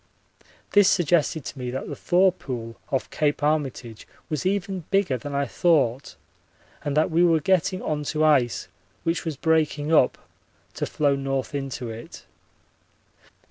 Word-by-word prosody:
This 205 -2 +6
suggested 160 -4 +1
to 140 - -7
me 125 -1 -3
that 130 +2 -4
the - - -5
thaw 185 +2 +3
pool 120 -9 -6 0.2
off 135 - 0
Cape 145 -1 0
Armitage 135 -7 -2 0.2
was 155 +3 -1
even 195 -3 -2
bigger 195 -8 +2
than 140 +4 -6
I 140 0 +1
thought 140 -6 +1 0.7
and 145 0 -2
that 155 +2 +2
we 170 +2 +4
were 165 -2 +4
getting 185 +3 +1
on 150 -1 -2
to 155 +2 0
ice 135 -7 +2 0.4
which 165 +1 -1
was 160 -4 -3
breaking 155 -1 +1
up, 130 - +4 0.6
to - - -3
flow 145 -2 +1
north 135 -1 -3
into 135 -4 -4
it. 115 +1 -10
150 Hz, 150 wpm, -24 LUFS, 135-170 Hz, 0.7 s, This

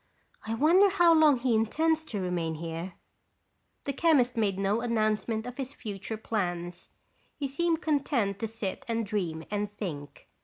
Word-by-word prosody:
"I 225 - -1
wonder 345 - +5
how 350 -3 +5
long 310 -4 +6
he 245 0 +1
intends 315 +9 +2
to 215 -9 -4
remain 175 -3 -2
here?" 165 +3 -5 0.9
The 280 - -2
chemist 270 -5 +3
made 205 -4 +1
no 200 +3 +1
announcement 220 -1 0
of 250 0 -7
his 270 0 -5
future 210 0 -5
plans. 175 -5 -3 0.5
He 280 - -3
seemed 330 +4 0
content 255 -10 0
to 225 - -2
sit 215 -3 -5
and 230 -1 -1
dream 180 -7 -2
and 205 0 -1
think. 145 -8 -6
225 Hz, 155 wpm, -29 LUFS, 195-275 Hz, 0.9 s, long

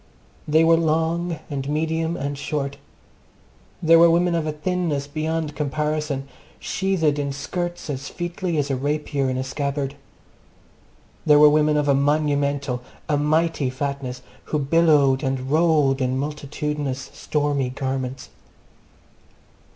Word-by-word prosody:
They 155 +2 +4
were 165 0 +5
long, 165 +1 0
and 140 -1 -4
medium, 160 +2 -1
and 140 +1 -3
short. 140 -1 -3 1.1
There 165 0 +7
were 170 0 +7
women 175 +1 +3
of 165 -2 0
a - - 0
thinness 155 -2 -1
beyond 155 +1 -3
comparison, 150 -1 -2 0.3
sheathed 170 -7 0
in 140 -1 -1
skirts 175 +5 -4
as 140 -2 -4
featly 175 -1 -3
as 145 -1 0
a - - +1
rapier 145 0 -1
in 130 - -1
a 130 - -1
scabbard. 140 +1 -2 1.3
There 150 -2 +6
were 150 0 +8
women 150 0 +3
of 150 -1 +1
a 140 - +5
monumental, 140 -2 +1 0.3
a 150 - +1
mighty 155 -1 +1
fatness, 130 -1 -4 0.2
who 150 - -1
billowed 145 -2 +3
and 130 0 -2
rolled 150 -4 +3
in 130 0 0
multitudinous, 145 -1 -3
stormy 145 -3 -1
garments. 130 0 -4
150 Hz, 130 wpm, -23 LUFS, 140-160 Hz, 1.3 s, were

